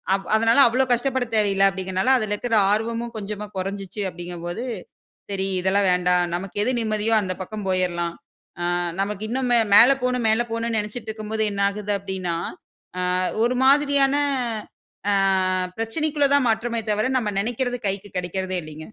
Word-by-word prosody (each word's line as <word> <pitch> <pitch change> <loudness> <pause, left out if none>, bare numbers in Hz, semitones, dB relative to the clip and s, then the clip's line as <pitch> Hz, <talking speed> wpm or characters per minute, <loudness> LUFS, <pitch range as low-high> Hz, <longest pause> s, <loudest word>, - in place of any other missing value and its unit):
அப் 195 - -6
அதனால 230 +4 +4
அவ்வளோ 255 +3 +2
கஷ்டப்படத் 245 -1 -1
தேவையில்ல 195 -2 +3
அப்டிங்கிறனால 190 +5 0
அதில 215 -3 -2
இருக்கற 230 +1 -1 0.2
ஆர்வமும் 230 +2 -1
கொஞ்சமா 210 0 -5
கொறஞ்சுச்சு 195 +2 -4
அப்டிங்கும் 175 -1 -8
போது. 175 +8 -4 0.7
சரி, 195 0 -1
இதெல்லாம் 195 +1 +2
வேண்டாம், 180 0 +2
நமக்கு 195 +2 -6
எது 255 - +1
நிம்மதியோ 215 0 0
அந்த 185 -2 -3
பக்கம் 210 +1 -6
போயரலாம். 175 -2 -1 0.5
ஆ - - -1 0.4
நமக்கு 205 +1 -3
இன்னும் 255 0 -1
மே 235 - +5 0.2
மேல 245 +5 +9
போணும் 250 -2 0
மேல 220 +2 +3
போணும்ன்னு 230 0 -1
நெனைச்சுட்டுருக்கும்போது 220 0 -4
என்ன 200 - -3
ஆகுது? 205 0 -3
அப்டின்னா, 185 -3 -3 0.6
அ - - -1 0.4
ஒரு 250 +1 +1
மாதிரியான 280 0 +4 1.0
ஆ - - +3 0.6
பிரச்சனைக்குள்ள 285 +5 0
தான் 265 -4 +3
மாற்றமே 230 +1 -1
தவர 215 +5 +1
நம்ம 215 -3 -2
நெனைக்கிறது 245 +3 -2
கைக்கு 195 0 -4
கிடைக்கிறதே 185 +1 -2
இல்லைங்க. 155 0 -10
210 Hz, 150 wpm, -23 LUFS, 190-235 Hz, 1.0 s, மேல